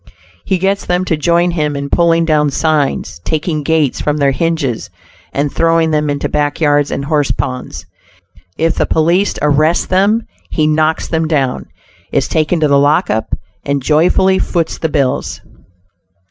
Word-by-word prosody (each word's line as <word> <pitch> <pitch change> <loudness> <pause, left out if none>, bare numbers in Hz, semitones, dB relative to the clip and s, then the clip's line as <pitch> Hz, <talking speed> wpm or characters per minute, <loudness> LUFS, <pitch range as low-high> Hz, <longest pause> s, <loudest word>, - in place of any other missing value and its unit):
He 190 - 0
gets 195 +2 0
them 180 +1 0
to 165 - 0
join 170 +3 +1
him 150 -3 -1
in 140 0 -3
pulling 165 +2 +2
down 150 -2 +2
signs, 145 - -1
taking 155 - -2
gates 155 -2 0
from 150 0 0
their 140 -2 +2
hinges 150 -5 -2 0.4
and 140 0 -2
throwing 165 -1 +2
them 150 -1 0
into 145 0 -1
back 145 -1 -1
yards 145 -2 +2
and 140 - -3
horse 145 -2 +1
ponds. 125 - -4 0.7
If 165 +1 +1
the - - -1
police 170 +5 +1
arrest 155 +3 +2
them, 205 +5 +2 0.2
he 155 - 0
knocks 155 +1 +1
them 160 -1 -1
down, 140 -5 -1 0.4
is - - +1
taken 160 +2 0
to 155 - +4
the 140 -1 +4
lockup, 145 - +1 0.3
and 140 0 -1
joyfully 175 +7 +2
foots 170 -3 -2
the 160 - -1
bills. 140 -3 -1
155 Hz, 160 wpm, -15 LUFS, 145-165 Hz, 0.7 s, to